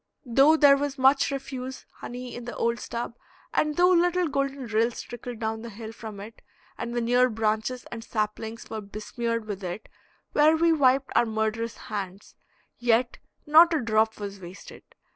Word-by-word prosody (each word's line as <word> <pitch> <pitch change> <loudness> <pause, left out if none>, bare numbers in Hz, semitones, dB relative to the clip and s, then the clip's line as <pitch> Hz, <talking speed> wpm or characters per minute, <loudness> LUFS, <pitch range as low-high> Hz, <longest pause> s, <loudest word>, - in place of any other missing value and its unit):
Though 275 +6 +5
there 285 -2 +7
was 285 0 -3
much 270 +1 +4
refuse 265 -1 -6
honey 245 0 -7
in 240 - -7
the 240 - -6
old 235 +1 0
stub, 235 0 -5 0.4
and 300 -1 +1
though 360 +1 +5
little 355 0 +3
golden 275 -2 -2
rills 225 +1 0
trickled 240 0 -8
down 220 0 -3
the 235 - -7
hill 220 +1 -8
from 220 -2 -9
it, 215 +3 -11 0.3
and 240 0 -5
the 240 - 0
near 245 +2 +3
branches 220 +2 -1
and 225 -1 -6
saplings 220 +1 -4
were 220 -1 -5
besmeared 225 +3 -4
with 205 -2 -6
it 180 +4 -5 0.4
where 310 +2 +4
we 335 0 +4
wiped 270 -2 +3
our 240 - +4
murderous 220 +1 -2
hands, 200 -2 -6 0.5
yet 240 0 +1 0.3
not 325 +2 +7
a - - +2
drop 220 -1 +1
was 200 -1 -6
wasted. 180 +1 -11
235 Hz, 170 wpm, -26 LUFS, 220-275 Hz, 0.5 s, there